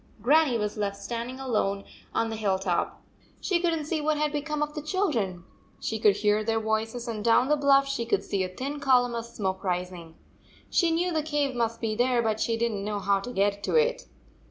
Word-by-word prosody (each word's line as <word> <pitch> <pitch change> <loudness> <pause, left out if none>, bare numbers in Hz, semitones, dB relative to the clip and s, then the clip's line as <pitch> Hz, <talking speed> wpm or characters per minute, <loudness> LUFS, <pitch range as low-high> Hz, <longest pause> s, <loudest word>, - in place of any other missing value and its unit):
Grannie 285 -1 +4
was 210 0 -3
left 200 -1 -1
standing 235 +5 -5
alone 210 -6 -1 0.3
on 225 0 0
the - - -3
hill 205 -3 +1
top. 185 -3 -2 0.4
She 360 -3 +1
could 345 -1 +1
n 325 - 0
t 305 - -5
see 310 0 -1
what 305 0 +1
had 300 0 0
be 295 - 0
come 300 0 -2
of 300 0 -4
the 300 - -4
children. 270 - -1 0.4
She 220 - -3
could 210 -2 +5
hear 210 +1 +2
their 225 +1 +1
voices, 225 +2 -2
and 220 -3 -4
down 235 +4 +4
the 300 - +5
bluff 275 -1 +4
she 235 -4 -2
could - - +1
see 195 -2 -1
a 185 - -3
thin 275 +10 -5
column 250 -3 +3
of 230 -1 -3
smoke 190 -4 -3
rising. 180 -3 -3 0.6
She 340 - +3
knew 345 +2 0
the 315 - +1
cave 295 -3 -1
must 230 -1 -1
be 225 -2 -1
there, 245 +1 +2
but 220 -1 0
she 230 0 0
did 235 0 0
n 210 - -3
t - - -5
know 210 0 -2
how 200 0 +1
to 245 +6 -6
get 200 -2 +1
to - - -1
it. - - +2
235 Hz, 235 wpm, -27 LUFS, 205-290 Hz, 0.6 s, could